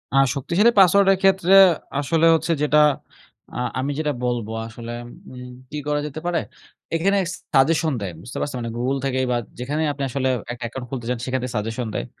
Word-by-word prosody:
আ - - +4 0.2
শক্তিশালী 185 - +3
পাসওয়ার্ডের 195 0 +5
ক্ষেত্রে 190 -1 +3 0.5
আসলে 160 +4 +1
হচ্ছে 160 +2 -1
যেটা 150 0 +3 0.8
আ - - -4 0.2
আমি 135 +2 -1
যেটা 150 -2 0
বলবো 120 -3 -2 0.2
আসলে 115 +1 -8 0.4
উম 125 0 -9 0.2
কি 150 - -4
করা 150 0 +1
যেতে 150 +2 -7
পারে? 175 -1 +1 0.6
এখানে 195 +5 +2 0.4
সাজেশন 155 +2 +3
দেয়। 95 -3 -3
বুঝতে 120 - -9
পারছেন? 145 - -3
মানে 115 -1 -4
গুগল 130 +3 0
থেকেই 130 -1 0
বা 120 - +2 0.2
যেখানেই 150 +5 -1
আপনি 140 - -5
আসলে 130 +1 -1 0.2
একটা 120 0 -7
অ্যাকাউন্ট 125 +2 -6
খুলতে 120 -3 -5
চান 125 - 0
সেখানটাই 130 -1 -2
সাজেশন 115 +3 -3
দেয়। - - -2
135 Hz, 175 wpm, -22 LUFS, 125-160 Hz, 0.8 s, পাসওয়ার্ডের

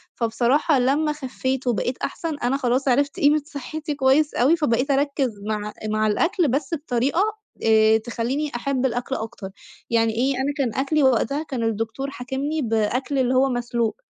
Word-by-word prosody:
فبصراحة 255 +6 +2
لمّا 285 +5 +2
خفّيت 260 -2 -3
وبقيت 245 +2 0
أحسن 325 -3 -4
أنا 250 +3 0
خلاص 260 +1 0
عرفت 280 +3 +1
قيمة 295 +1 +4
صحتي 300 +1 -5
كويس 280 +2 +3
أوي، 275 +8 +4
فبقيت 270 -2 +1
أركّز 275 -6 0
مع 210 -1 -3 0.2
مع 215 0 +1
الأكل 335 - +1
بس 275 +3 -1
بطريقة 280 +1 0 0.4
آآ، 220 0 +5
تخلّيني 240 +6 -3
أحب 265 +1 -1
الأكل 245 +1 -1
أكتر. 220 -4 -6 0.4
يعني 225 -1 +2
إيه، 260 +5 +1
أنا 270 +3 -1
كان 255 -6 0
أكلي 280 +2 +1
وقتها 270 +3 +2
كان 260 -6 -4
الدكتور 225 +5 -2
حاكمني 275 +5 -3
بأكل 240 +4 0
اللي 255 0 +2
هو 270 +1 +4
مسلوق، 235 -3 -1
260 Hz, 160 wpm, -23 LUFS, 235-285 Hz, 0.4 s, آآ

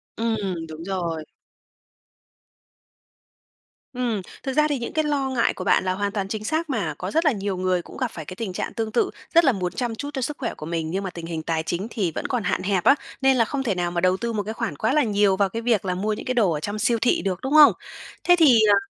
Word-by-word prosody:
Ừm, 225 0 0 0.3
đúng 160 +1 -8
rồi. 170 -4 -2 2.7
Ừm, 240 -5 -1 0.2
thực 265 - -2
ra 300 +2 +4
thì 285 -4 -1
những 235 - -5
cái 310 - +1
lo 280 -3 0
ngại 245 -3 +1
của 185 - -6
bạn 190 - +3
là 185 0 0
hoàn 200 +1 -2
toàn 200 -2 -2
chính 215 +1 -4
xác 315 +6 -1
mà. 200 - -1
Có 185 - -4
rất 325 +2 +1
là 305 - +5
nhiều 200 -3 -3
người 185 -1 +1
cũng - - -12
gặp - - -1
phải 160 - -8
cái 185 - -8
tình 205 -4 -4
trạng - - -4
tương 225 -2 -3
tự, 400 - +2 0.2
rất 335 0 +6
là 270 - +6
muốn 180 -5 -2
chăm 240 -3 -2
chút 285 +5 -5
cho 265 - -3
sức 290 +4 -3
khỏe 235 - -3
của 150 - -9
mình, 165 -1 -3
nhưng 195 +2 -2
mà 190 - -3
tình 170 -2 -8
hình 165 -1 -4
tài 160 -1 -1
chính 175 +6 -3
thì 190 -8 -1
vẫn - - -3
còn 245 -5 -1
hạn - - -1
hẹp 190 -2 +1
á, 275 - +6 0.3
nên 265 -1 +4
là 230 - +4
không 270 +4 -3
thể 215 -7 0
nào 175 -1 -1
mà 175 - -1
đầu 185 +1 +3
tư 235 +1 -3
một 205 -2 -1
cái 220 - -4
khoản 225 -8 -3
quá 220 - +1
là 300 - +4
nhiều 205 -3 +2
vào 200 -1 +2
cái 230 +4 -4
việc 225 -5 +1
là 180 - -1
mua 210 +4 -1
những 210 - -6
cái 255 - 0
đồ 220 -8 +3
ở 150 - -1
trong 205 +7 -4
siêu 235 -2 +2
thị 245 - +2
được, 185 0 -2
đúng 265 - -2
không? 305 -1 +9 0.5
Thế 355 - +6
thì, 270 -8 +7
ờ, - - +7
210 Hz, 275 wpm, -24 LUFS, 185-250 Hz, 2.7 s, không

